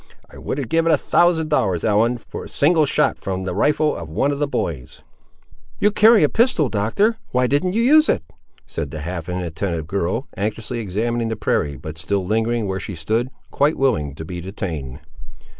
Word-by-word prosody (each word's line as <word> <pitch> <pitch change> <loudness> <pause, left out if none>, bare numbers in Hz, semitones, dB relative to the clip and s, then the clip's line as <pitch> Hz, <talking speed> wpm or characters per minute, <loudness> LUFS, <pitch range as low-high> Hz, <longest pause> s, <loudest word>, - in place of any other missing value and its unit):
I - - -11
would - - -4
have 135 -4 -3
given 165 +5 +2
a - - +5
thousand 165 -3 +2
dollars, 95 - +1
Ellen, 115 +3 +2
for - - -9
a - - -10
single 155 0 +3
shot - - +1
from 95 -1 -3
the 95 - -3
rifle 150 - +2
of 80 - -7
one 135 - 0
of 140 - -3
the 145 - +1
boys!" 75 - -4 0.7
"You 210 - +3
carry 220 0 +6
a - - +6
pistol, 225 - +2
Doctor, 115 - +1
why 125 0 +1
didn't 145 +8 +1
you 230 +2 +2
use 305 +5 +5
it?" - - +1 0.4
said - - -5
the 75 - -6
half 85 +1 -5
inattentive 85 -2 -3
girl, 95 - -2
anxiously 110 +4 -3
examining 115 +3 -1
the 110 - -2
prairie, 75 -8 -1
but 80 +5 -8
still 95 +4 -1
lingering 115 +2 0
where 95 0 -2
she 100 0 -6
stood, 110 +10 -1 0.2
quite 145 +3 +2
willing 90 - 0
to 80 - -7
be 90 +1 -6
detained. 80 -8 -5
110 Hz, 190 wpm, -21 LUFS, 90-145 Hz, 0.7 s, carry